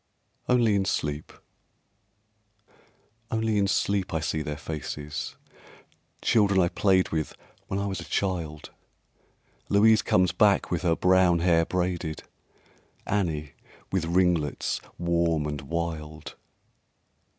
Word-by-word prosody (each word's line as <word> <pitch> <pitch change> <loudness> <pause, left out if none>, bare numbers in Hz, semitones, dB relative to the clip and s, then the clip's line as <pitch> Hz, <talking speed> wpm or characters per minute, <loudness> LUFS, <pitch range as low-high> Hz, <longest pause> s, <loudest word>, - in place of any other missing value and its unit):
"Only 120 -4 +4
in 100 -1 +1
Sleep" 75 -5 -2 2.0
Only 110 -2 0
in 100 - +2
sleep 100 -2 0
I - - +1
see 80 0 -2
their 75 -1 -4
faces, 75 -1 -5 0.9
Children 100 -4 +3
I 85 -2 +3
played 95 -1 +2
with 80 -1 -3 0.3
when 95 - -2
I 100 - -1
was 95 -1 -3
a - - -6
child, 85 -6 -3 1.0
Louise 110 +2 +5
comes 90 0 +2
back 105 -3 +3
with 85 - 0
her 85 -3 +2
brown 90 -1 +4
hair 85 -1 +3
braided, 90 -3 -2 0.8
Annie 80 -8 -1 0.4
with 95 -4 0
ringlets 85 -4 +1 0.2
warm 85 -3 +1
and 75 -1 -4
wild. 80 0 -5
85 Hz, 115 wpm, -26 LUFS, 80-95 Hz, 2.0 s, Louise